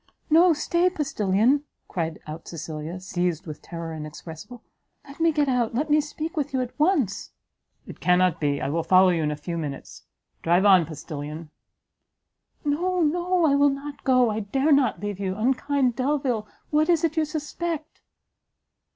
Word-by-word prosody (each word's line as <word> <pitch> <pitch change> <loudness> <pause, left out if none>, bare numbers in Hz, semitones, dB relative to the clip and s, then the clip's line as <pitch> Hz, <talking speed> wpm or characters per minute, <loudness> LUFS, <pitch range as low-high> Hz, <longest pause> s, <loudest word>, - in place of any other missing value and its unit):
"No! 340 +3 +7
stay, 340 +3 +2
postilion!" 255 - +1 0.2
called 165 -3 -3
out 155 +2 -8
Cecilia, 160 +1 -6
seized 175 -3 -2
with 155 -3 -8
terror 165 -1 -6
inexpressible; 160 +8 -9 0.4
"let 280 +2 -12
me 330 0 +4
get 295 -2 +1
out, 245 -3 0
let 295 +4 -1
me 300 0 +5
speak 310 +2 -6
with 290 -2 -2
you 260 - +1
at 250 -1 -4
once!" 295 - +1 0.5
"It - - -11
cannot 180 -2 +2
be; 145 -1 +1
I 135 - -2
will 165 +3 0
follow 185 +2 +5
you 170 -2 +1
in 150 - 0
a 150 - -2
few 170 +3 -5
minutes 145 -3 -7 0.4
drive 175 +4 +3
on, 185 -5 +6
postilion!" 150 0 -7 1.1
"No, 355 +5 0
no! 350 +3 +1
I 290 - +4
will 285 0 +5
not 280 +1 -6
go 255 -3 +4
I 215 - -2
dare 270 +9 0
not 275 -4 +3
leave 205 -2 -4
you 190 -1 -2
unkind 260 +2 +1
Delvile! 260 -5 -1 0.2
what 310 +2 +2
is 335 -2 +3
it 320 -2 +1
you 320 - +2
suspect." 310 +1 -4
245 Hz, 170 wpm, -25 LUFS, -, 1.1 s, No